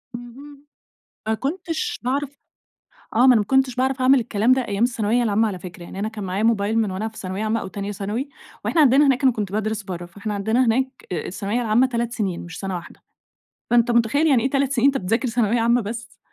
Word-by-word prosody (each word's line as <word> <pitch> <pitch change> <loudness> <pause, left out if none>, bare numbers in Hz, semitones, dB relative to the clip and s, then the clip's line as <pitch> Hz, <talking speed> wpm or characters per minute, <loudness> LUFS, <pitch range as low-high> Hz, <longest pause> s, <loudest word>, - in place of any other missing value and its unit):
اهم، 275 +4 -11 0.6
ما 220 - +2
كنتش 330 - -3
باعرف 280 +3 -3 0.7
آه، - - +1
ما 250 - +6
أنا 255 -2 +7
ما 210 - +3
كنتش 265 +1 +2
باعرف 260 +1 0
أعمل 265 +1 +5
الكلام 225 0 +1
ده 260 -2 -1
أيام 200 +2 0
الثانوية 240 0 +1
العامة 220 0 +2
على 190 -4 -5
فكرة، 175 0 -10
يعني 190 - -8
أنا 210 - -1
كان 215 -2 -7
معايا 190 +3 -2
موبايل 220 -1 +2
من 215 -3 0
وأنا 195 +4 -3
في 220 - -11
ثانوية 190 +3 -4
عامة 220 +1 0
أو - - -6
تانية 200 +1 -5
ثانوي، 210 +7 -4 0.4
وإحنا 325 - +3
عندنا 280 +1 +5
هناك 270 +1 +2
أنا 260 - +6
كنت 205 -4 -4
بادرس 215 0 -2
برّه، 175 -2 -6
فاحنا 205 +5 -6
عندنا 220 +5 +1
هناك 255 +4 +2 0.2
أ 170 -4 -3
الثانوية 205 +6 -2
العامة 235 +3 +3
3 235 -1 -2
سنين 195 -7 -2
مش 170 -1 -9
سنة 195 -2 -3
واحدة 175 - -9 0.7
فأنت 240 0 +4
متخيّل 235 +7 +2
يعني 260 -7 +4
إيه 265 - +1
3 275 -1 +1
سنين 260 -1 +3
أنت 275 -1 +3
بتذاكر 225 +7 0
ثانوية 230 0 +1
عامة 235 +2 +3
بس، 230 +2 -7
230 Hz, 220 wpm, -22 LUFS, 205-255 Hz, 0.7 s, أنا